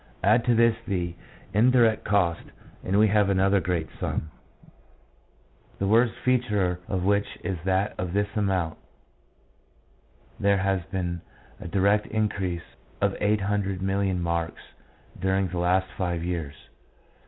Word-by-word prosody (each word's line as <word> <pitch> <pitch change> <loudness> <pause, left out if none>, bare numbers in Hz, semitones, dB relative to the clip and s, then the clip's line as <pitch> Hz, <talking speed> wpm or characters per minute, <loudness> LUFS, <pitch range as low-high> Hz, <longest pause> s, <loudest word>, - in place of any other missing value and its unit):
Add 110 +5 +4
to 120 -1 +3
this 115 0 +4
the 90 -3 -1 0.4
indirect 115 +1 +4
cost 90 -5 +2 0.4
and 95 +2 0
we 110 +1 +6
have 105 -1 +3
another 95 +1 +3
great 85 -2 -1
sum, 80 - -3 1.5
the 100 - -1
worst 115 +3 +3
feature 105 -8 +1
of 95 -2 -2
which 100 +1 +1
is 95 -3 -3
that 95 +2 +1
of 90 -2 -2
this 100 +2 -1
amount 95 -6 0 1.6
there 100 0 +3
has 95 -1 0
been 90 -3 -3 0.4
a - - -7
direct 100 +3 +2
increase 100 -5 -1 0.4
of - - +1
800,000,000 100 -2 0
marks 85 -1 -2 0.6
during 95 0 +1
the 90 0 -3
last 90 +2 +2
five 85 -3 -2
years. 85 -5 -3
95 Hz, 125 wpm, -26 LUFS, 90-105 Hz, 1.6 s, we